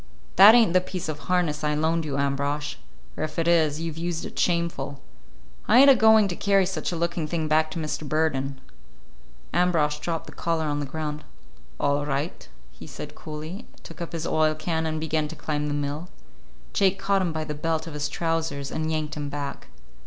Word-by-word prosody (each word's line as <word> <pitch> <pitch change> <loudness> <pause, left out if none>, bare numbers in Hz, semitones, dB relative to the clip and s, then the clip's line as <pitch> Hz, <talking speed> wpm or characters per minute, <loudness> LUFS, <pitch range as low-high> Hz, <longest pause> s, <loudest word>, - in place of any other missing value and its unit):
"That 205 +5 +10
ain't 225 -8 +5
the 185 - +5
piece 185 -2 -5
of 150 -1 -4
harness 170 -5 +1
I 150 0 +1
loaned 160 +2 +1
you, 140 -2 -2
Ambrosch; 140 +1 -1 0.4
or - - -3
if 155 - -5
it 165 0 +1
is, 160 -3 +3
you've 165 -1 -4
used 170 -1 -3
it - - -7
shameful. 170 -5 0 0.7
I 235 - +6
ain't 275 +2 +9
a - - +6
going 220 -2 +6
to 175 - -3
carry 195 0 +3
such 190 0 -3
a - - -3
looking 170 -1 -1
thing 160 -1 -1
back 155 +1 +3
to 155 - -6
Mr. 155 -1 -4
Burden." 140 -4 0 0.9
Ambrosch 155 -4 +2
dropped 165 0 -3
the - - -11
collar 165 -1 -1
on 145 -1 -1
the 145 - -3
ground. 150 +1 -4 0.6
"All 145 +1 +1
right," 145 - -3 0.2
he - - -12
said - - -8
coolly, 155 +7 -8 0.2
took - - -11
up 170 - -5
his 165 -1 -3
oil 155 0 +2
can, 160 +1 -2
and 155 0 -2
began 155 -1 -1
to - - -8
climb 150 -1 -2
the 145 - -1
mill. 145 +4 -3 0.6
Jake 195 0 +3
caught 195 0 +1
him 180 -3 0
by 160 -1 -3
the 150 -1 -4
belt 160 +1 -2
of 165 - -8
his 150 0 -2
trousers 165 -4 -2
and 160 0 -2
yanked 155 -1 -2
him 145 -1 -4
back. 140 -1 -5
155 Hz, 205 wpm, -25 LUFS, 150-170 Hz, 0.9 s, That